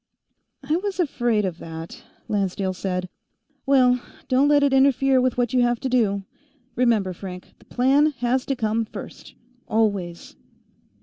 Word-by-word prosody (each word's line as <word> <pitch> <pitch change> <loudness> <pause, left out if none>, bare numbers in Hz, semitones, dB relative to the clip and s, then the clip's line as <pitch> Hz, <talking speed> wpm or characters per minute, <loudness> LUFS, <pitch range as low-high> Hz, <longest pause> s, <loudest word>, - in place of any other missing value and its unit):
"I 310 +3 +2
was 390 +1 -4
afraid 240 - +1
of 175 -3 -4
that," 160 0 -9 0.2
Lancedale 195 -2 -1
said. 185 0 -3 0.6
"Well, 250 -2 +4 0.3
don't 260 +2 +3
let 290 -1 +4
it 280 -1 +2
interfere 270 -1 +4
with 255 -1 0
what 245 -1 0
you 250 - +3
have 240 -1 +1
to 265 - -2
do. 210 -6 +1 0.5
Remember, 225 -6 +1
Frank; 180 0 -9
the - - -21
Plan 270 +4 +3
has 245 +1 0
to 275 - 0
come 225 -1 0
first, - - -10 0.3
always." 200 -6 -1
240 Hz, 145 wpm, -23 LUFS, 195-265 Hz, 0.6 s, Well